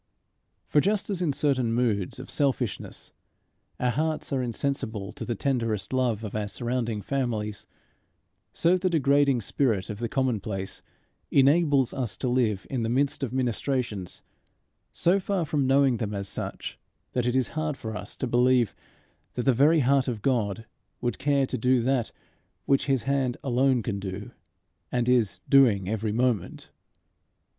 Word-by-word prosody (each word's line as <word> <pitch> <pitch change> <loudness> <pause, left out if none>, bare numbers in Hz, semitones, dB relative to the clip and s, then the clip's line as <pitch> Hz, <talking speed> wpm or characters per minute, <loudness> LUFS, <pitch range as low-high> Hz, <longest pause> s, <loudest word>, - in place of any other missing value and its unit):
For 150 - +3
just 205 +3 0
as 185 -3 -2
in 165 -5 +1
certain 135 -5 +1
moods 110 -6 0
of - - -8
selfishness 135 -5 -2 0.7
our 125 0 +1
hearts 155 +3 -2
are 135 - +1
insensible 115 -5 -3
to - - -7
the 120 - -2
tenderest 115 -4 -1
love 120 -4 +1
of 105 - -6
our 105 -1 -1
surrounding 120 -1 -2
families, 110 -6 -2 0.8
so 175 +2 +3
the 185 0 +1
degrading 140 -5 +3
spirit 110 -3 0
of 105 - -7
the 120 -1 -2
commonplace 110 -8 -2 0.5
enables 140 -1 +4
us 125 -5 -3
to 130 - -2
live 115 -6 +1
in 130 -3 -2
the 115 - -1
midst 135 +4 +1
of 135 -4 -2
ministrations, 125 -5 -2 0.7
so 180 +3 +2
far 190 -2 -1
from 145 -3 0
knowing 135 -2 +4
them 105 -2 -3
as 100 0 -3
such, - - -5 0.3
that 125 -1 0
it 125 - +1
is 130 -2 +1
hard 155 -2 -2
for 110 -4 -6
us 100 -1 -7
to - - -2
believe 125 -1 +3 0.6
that 125 - -1
the 135 - +4
very 150 +6 +4
heart 135 +1 +3
of 115 -5 -3
God 115 -4 0 0.3
would 120 -1 -2
care 140 -1 +2
to - - -4
do 125 +2 +3
that 130 -2 0 0.5
which 140 0 +2
his 135 -4 +1
hand 135 -3 0
alone 130 -1 +2
can 100 -3 -3
do 100 +1 -6 0.6
and 120 -1 0
is 120 -5 +2
doing 115 -9 +5
every 110 +1 -1
moment. 120 -3 -1
125 Hz, 160 wpm, -26 LUFS, 110-140 Hz, 0.8 s, doing